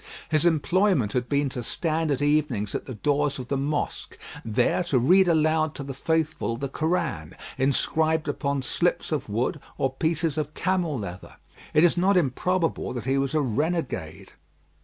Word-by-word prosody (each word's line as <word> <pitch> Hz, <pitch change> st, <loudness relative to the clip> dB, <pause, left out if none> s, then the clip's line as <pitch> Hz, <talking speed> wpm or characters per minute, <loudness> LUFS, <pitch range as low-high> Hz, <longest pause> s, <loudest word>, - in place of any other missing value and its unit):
His 155 Hz, +1 st, +3 dB
employment 170 Hz, -, +2 dB
had 125 Hz, -1 st, -1 dB
been 145 Hz, 0 st, +2 dB
to 125 Hz, -, -5 dB
stand 160 Hz, +6 st, -1 dB
at 140 Hz, -1 st, 0 dB
evenings 145 Hz, -9 st, +1 dB
at -, -, -4 dB
the 130 Hz, -, -6 dB
doors 145 Hz, +4 st, 0 dB
of 125 Hz, -2 st, -7 dB
the 140 Hz, -, 0 dB
mosque, 145 Hz, +2 st, -3 dB, 0.3 s
there 120 Hz, +10 st, +1 dB
to 145 Hz, -6 st, +1 dB
read 180 Hz, +10 st, +5 dB
aloud 155 Hz, -1 st, +2 dB
to 140 Hz, -, -5 dB
the 135 Hz, 0 st, -6 dB
faithful 155 Hz, -4 st, -1 dB
the 140 Hz, -, -3 dB
Koran 155 Hz, -, -2 dB, 0.2 s
inscribed 155 Hz, +4 st, +1 dB
upon 140 Hz, -2 st, -1 dB
slips 175 Hz, +6 st, 0 dB
of 145 Hz, -7 st, -2 dB
wood, 120 Hz, +8 st, -1 dB, 0.2 s
or 135 Hz, -1 st, 0 dB
pieces 160 Hz, +1 st, 0 dB
of 150 Hz, 0 st, -4 dB
camel 180 Hz, -6 st, 0 dB
leather. 90 Hz, -4 st, -7 dB, 0.4 s
It 155 Hz, -, +6 dB
is 175 Hz, 0 st, +4 dB
not 190 Hz, +2 st, +3 dB
improbable 170 Hz, +3 st, 0 dB
that 120 Hz, -3 st, -5 dB
he 135 Hz, +1 st, +1 dB
was 135 Hz, +2 st, -1 dB
a 155 Hz, -, +3 dB
renegade. 135 Hz, -, -2 dB
145 Hz, 170 wpm, -25 LUFS, 130-160 Hz, 0.4 s, It